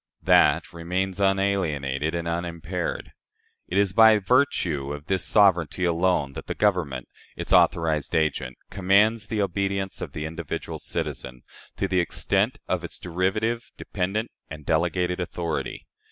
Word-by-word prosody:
That -, -, +4 dB
remains, 90 Hz, +3 st, -2 dB
unalienated 85 Hz, -7 st, 0 dB
and 85 Hz, 0 st, -3 dB
unimpaired. 85 Hz, +1 st, -3 dB, 0.6 s
It 95 Hz, -, -2 dB
is 100 Hz, -2 st, +2 dB
by 110 Hz, +1 st, +7 dB
virtue 95 Hz, -, +1 dB
of 75 Hz, 0 st, -8 dB
this 95 Hz, +2 st, -1 dB
sovereignty 90 Hz, -4 st, +3 dB
alone 85 Hz, -4 st, +1 dB
that -, -, -8 dB
the -, -, -3 dB
Government, 85 Hz, -12 st, 0 dB, 0.3 s
its -, -, -3 dB
authorized 80 Hz, -3 st, +3 dB
agent, 80 Hz, -1 st, 0 dB
commands 105 Hz, +3 st, +3 dB
the 110 Hz, -3 st, 0 dB
obedience 95 Hz, +1 st, -2 dB
of -, -, -6 dB
the 75 Hz, -, -4 dB
individual 80 Hz, -1 st, -5 dB
citizen, 60 Hz, -1 st, -5 dB, 0.3 s
to 100 Hz, -, 0 dB
the 95 Hz, -1 st, +1 dB
extent 100 Hz, +7 st, 0 dB
of 90 Hz, -2 st, -1 dB
its 85 Hz, -, -7 dB
derivative, 105 Hz, +7 st, -1 dB
dependent, 105 Hz, +4 st, -3 dB, 0.2 s
and 75 Hz, -1 st, -9 dB
delegated 90 Hz, +2 st, 0 dB
authority. 85 Hz, -2 st, -3 dB
90 Hz, 135 wpm, -25 LUFS, 80-100 Hz, 0.6 s, by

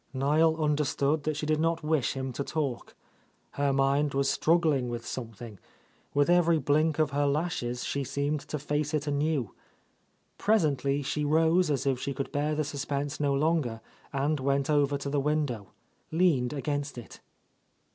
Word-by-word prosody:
Niel 155 Hz, +4 st, +3 dB
understood 150 Hz, -1 st, 0 dB
that 155 Hz, -1 st, -1 dB
she 150 Hz, -, -3 dB
did 155 Hz, 0 st, +1 dB
not 165 Hz, 0 st, 0 dB
wish 155 Hz, -4 st, +1 dB
him 130 Hz, -1 st, -4 dB
to 140 Hz, -, -3 dB
talk. 140 Hz, -5 st, -3 dB, 0.6 s
Her 140 Hz, 0 st, 0 dB
mind 135 Hz, +1 st, +2 dB
was 140 Hz, 0 st, +2 dB
struggling 155 Hz, -6 st, +2 dB
with 120 Hz, -1 st, -5 dB
something, 115 Hz, -4 st, -7 dB, 0.5 s
with 145 Hz, 0 st, +2 dB
every 170 Hz, -1 st, +4 dB
blink 155 Hz, +1 st, +2 dB
of 155 Hz, -3 st, +1 dB
her 145 Hz, 0 st, +1 dB
lashes 140 Hz, -5 st, -1 dB
she 140 Hz, -, -2 dB
seemed 140 Hz, +3 st, -1 dB
to 150 Hz, -, -3 dB
face 150 Hz, +1 st, -1 dB
it 150 Hz, -1 st, -1 dB
anew. 145 Hz, -5 st, -1 dB, 0.9 s
Presently 145 Hz, -9 st, +1 dB
she 150 Hz, +2 st, -2 dB
rose 160 Hz, +3 st, +3 dB
as 140 Hz, -1 st, 0 dB
if 135 Hz, -2 st, +1 dB
she 140 Hz, +1 st, -3 dB
could 140 Hz, 0 st, -4 dB
bear 150 Hz, +1 st, 0 dB
the 155 Hz, -, 0 dB
suspense 145 Hz, 0 st, -3 dB
no 145 Hz, -1 st, +1 dB
longer 145 Hz, -6 st, 0 dB, 0.3 s
and 145 Hz, +2 st, 0 dB
went 140 Hz, +2 st, 0 dB
over 145 Hz, -1 st, +2 dB
to 140 Hz, -, -6 dB
the 145 Hz, -, +1 dB
window, 140 Hz, -8 st, -1 dB, 0.4 s
leaned 155 Hz, -7 st, +2 dB
against 145 Hz, -1 st, -3 dB
it. 120 Hz, -, -10 dB
145 Hz, 165 wpm, -28 LUFS, 135-155 Hz, 0.9 s, every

